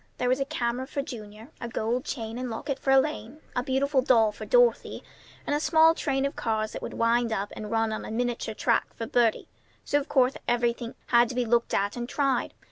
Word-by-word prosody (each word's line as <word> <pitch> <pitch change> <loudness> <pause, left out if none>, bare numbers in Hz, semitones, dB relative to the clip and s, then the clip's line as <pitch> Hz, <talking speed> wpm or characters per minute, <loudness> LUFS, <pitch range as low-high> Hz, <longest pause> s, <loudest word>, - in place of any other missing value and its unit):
There 250 - 0
was 255 +2 +2
a 275 - 0
camera 245 0 -2
for 280 0 -3
Junior, 220 -2 -9
a 235 - -3
gold 235 +4 -2
chain 230 -2 -5
and 255 -1 -3
locket 265 +4 -4
for - - -3
Elaine, 270 -1 +1 0.2
a 245 - +1
beautiful 265 +2 +1
doll 230 -4 +4
for 205 - -9
Dorothy, - - +2 0.4
and 290 - 0
a - - +1
small 320 +1 +5
train 275 -4 -1
of 280 - -3
cars 215 -1 -1
that - - -7
would - - -6
wind 230 0 +2
up 205 -1 -2
and 210 - -6
run 225 0 0
on 215 - -4
a - - -7
miniature 235 -1 -2
track 230 +1 0
for 230 - -4
Bertie; 230 -1 +1 0.4
so 290 - +2
of 285 - -7
course 260 -1 +3
everything 240 0 0
had 235 -1 +5
to 250 - -5
be 250 -1 0
looked 235 +1 +1
at 200 +1 0
and 240 0 -5
tried. 275 -2 0
245 Hz, 220 wpm, -27 LUFS, 225-270 Hz, 0.4 s, small